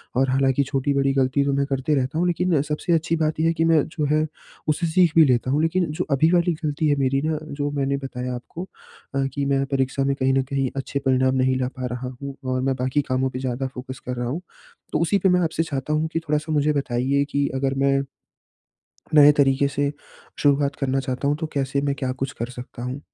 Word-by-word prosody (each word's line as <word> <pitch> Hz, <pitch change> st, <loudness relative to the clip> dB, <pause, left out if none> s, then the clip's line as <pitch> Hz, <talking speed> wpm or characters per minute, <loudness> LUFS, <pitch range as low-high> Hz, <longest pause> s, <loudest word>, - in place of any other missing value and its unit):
और 135 Hz, +1 st, +2 dB
हालाँकि 135 Hz, +1 st, +2 dB
छोटी, 135 Hz, +1 st, -1 dB
बड़ी 135 Hz, 0 st, +2 dB
गलती 135 Hz, +1 st, +2 dB
तो 140 Hz, -, +1 dB
मैं 140 Hz, 0 st, +1 dB
करते 140 Hz, +2 st, 0 dB
रहता 135 Hz, +3 st, -1 dB
हूँ, 180 Hz, -, +2 dB
लेकिन 175 Hz, 0 st, +1 dB
अ, 140 Hz, -, +3 dB
सबसे 150 Hz, +3 st, -1 dB
अच्छी 160 Hz, 0 st, +1 dB
बात 155 Hz, 0 st, 0 dB
ये 160 Hz, -, +3 dB
है 165 Hz, -, +2 dB
कि 165 Hz, 0 st, +1 dB
मैं 160 Hz, -3 st, +4 dB
जो 150 Hz, -, +1 dB
है 155 Hz, 0 st, +2 dB, 0.4 s
उससे 165 Hz, +3 st, +1 dB
सीख 170 Hz, -1 st, +3 dB
भी 160 Hz, -, +8 dB
लेता 130 Hz, -1 st, +1 dB
हूँ। 150 Hz, +3 st, +2 dB
लेकिन 175 Hz, +2 st, +1 dB
जो 155 Hz, -, -2 dB
अभी 155 Hz, +5 st, +4 dB
वाली 175 Hz, -1 st, +3 dB
गलती 150 Hz, 0 st, 0 dB
है 145 Hz, -, +3 dB
मेरी 135 Hz, +1 st, +1 dB
ना, 155 Hz, -1 st, 0 dB
जो 145 Hz, -1 st, -3 dB
मैंने 140 Hz, -1 st, 0 dB
बताया 125 Hz, -2 st, -5 dB
आपको 140 Hz, +8 st, -7 dB, 0.5 s
अ, 135 Hz, -, +1 dB
कि 140 Hz, -1 st, -1 dB
मैं 135 Hz, 0 st, +1 dB
परीक्षा 135 Hz, +1 st, 0 dB
में 140 Hz, 0 st, +1 dB
कहीं 130 Hz, 0 st, +1 dB
न 135 Hz, 0 st, +2 dB
कहीं 135 Hz, -1 st, 0 dB
अच्छे 140 Hz, +1 st, -2 dB
परिणाम 130 Hz, 0 st, +3 dB
नहीं 130 Hz, 0 st, +2 dB
ला 125 Hz, -, 0 dB
पा 130 Hz, -, -3 dB
रहा 125 Hz, +1 st, -5 dB
हूँ 140 Hz, -1 st, -6 dB
और 130 Hz, 0 st, 0 dB
मैं 135 Hz, 0 st, 0 dB
बाकी 130 Hz, +3 st, +1 dB
कामों 130 Hz, +1 st, +1 dB
पे 130 Hz, 0 st, -6 dB
ज़्यादा 130 Hz, 0 st, -2 dB
फ़ोकस 130 Hz, 0 st, -8 dB
कर 125 Hz, -, -2 dB
रहा 120 Hz, -1 st, -2 dB
हूँ। 155 Hz, +8 st, -3 dB, 0.5 s
तो 150 Hz, -, +2 dB
उसी 170 Hz, +4 st, +2 dB
पे 190 Hz, -, +3 dB
मैं 180 Hz, 0 st, +3 dB
आपसे 165 Hz, -1 st, 0 dB
चाहता 145 Hz, -1 st, -3 dB
हूँ 155 Hz, +1 st, +1 dB
कि 165 Hz, -, +1 dB
थोड़ा-सा 155 Hz, -1 st, -2 dB
मुझे 150 Hz, 0 st, +2 dB
बताइए 140 Hz, 0 st, 0 dB
कि 140 Hz, 0 st, +1 dB
अगर 135 Hz, 0 st, 0 dB
मैं 135 Hz, 0 st, +3 dB, 1.2 s
नए 150 Hz, -1 st, +8 dB
तरीके 140 Hz, -1 st, +3 dB
से 140 Hz, +1 st, -1 dB, 0.5 s
शुरुआत 145 Hz, 0 st, +2 dB
करना 135 Hz, -1 st, 0 dB
चाहता 130 Hz, +1 st, -2 dB
हूँ, 145 Hz, -, +2 dB
तो 160 Hz, 0 st, -3 dB
कैसे 140 Hz, 0 st, 0 dB
मैं 140 Hz, -1 st, 0 dB
क्या 130 Hz, -2 st, -1 dB
कुछ 135 Hz, +1 st, -4 dB
कर 120 Hz, -, -2 dB
सकता 125 Hz, -1 st, -9 dB
हूँ? 125 Hz, +3 st, -4 dB
140 Hz, 240 wpm, -23 LUFS, 130-150 Hz, 1.2 s, भी